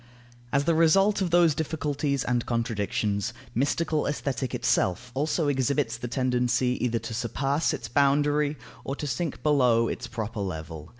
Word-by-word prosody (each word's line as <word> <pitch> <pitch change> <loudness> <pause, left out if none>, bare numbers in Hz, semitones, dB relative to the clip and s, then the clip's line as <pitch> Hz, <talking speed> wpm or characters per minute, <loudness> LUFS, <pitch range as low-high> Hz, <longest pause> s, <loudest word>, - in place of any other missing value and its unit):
As 140 - +2
the 165 - +2
result 195 +6 +4
of 185 - +1
those 170 -2 +5
difficulties 145 -2 -1
and 120 -1 -1
contradictions, 110 -3 -1 0.2
mystical 150 +4 0
Aesthetic 135 -4 -2
itself 120 +7 0
also 150 +3 0
exhibits 135 -2 0
the 120 +1 -5
tendency, 125 0 0
either 120 -2 +1
to 115 - -6
surpass 135 +7 0
its 130 -6 -4
boundary, 145 +3 +2 0.3
or 135 - -3
to 150 - -5
sink 145 +4 -3
below 125 -6 +3
its 120 - -4
proper 110 -2 -5
level. 80 -4 -5
135 Hz, 145 wpm, -26 LUFS, 115-150 Hz, 0.3 s, those